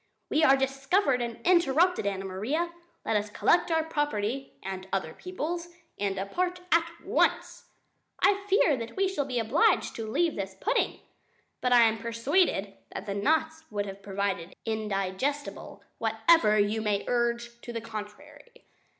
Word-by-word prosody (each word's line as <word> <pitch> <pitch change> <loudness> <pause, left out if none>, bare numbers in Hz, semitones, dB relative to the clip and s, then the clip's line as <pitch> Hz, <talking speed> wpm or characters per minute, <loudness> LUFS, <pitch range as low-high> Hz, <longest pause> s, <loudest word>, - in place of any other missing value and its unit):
"We 310 - +3
are 275 -3 +6
discovered 270 +2 +1
and 235 -1 -4
interrupted, 345 - +3
Anna 195 -1 -2
Maria; 255 - -2 0.3
let 220 - 0
us 210 0 0
collect 345 +12 +2
our 325 -1 +2
property 275 -5 -2
and 190 0 -5
other 175 -5 -2
people's 345 -1 -4 0.3
and 200 -1 0
depart 355 - -2
at 335 0 +4
once. - - 0 0.5
"I 400 0 +3
fear 380 -7 +4
that 230 -1 -7
we 390 0 +2
shall 335 -7 -1
be 255 -2 -3
obliged 235 - +2
to 225 -1 -4
leave 335 +8 +1
this 195 -1 -4
pudding. 485 +4 0 0.6
"But 250 - +1
I 240 -1 +7
am 225 0 +2
persuaded 230 - +1 0.2
that 195 - -6
the 200 - -3
knots 315 +9 0
would 205 -1 -2
have 195 0 -8
proved 195 -3 -3
indigestible, 220 +5 -3 0.2
whatever 225 +1 +4
you 210 +2 +1
may 205 -2 0
urge 235 0 -1
to 240 - -7
the 230 - -3
contrary." 215 - -10
235 Hz, 150 wpm, -28 LUFS, 205-320 Hz, 0.6 s, I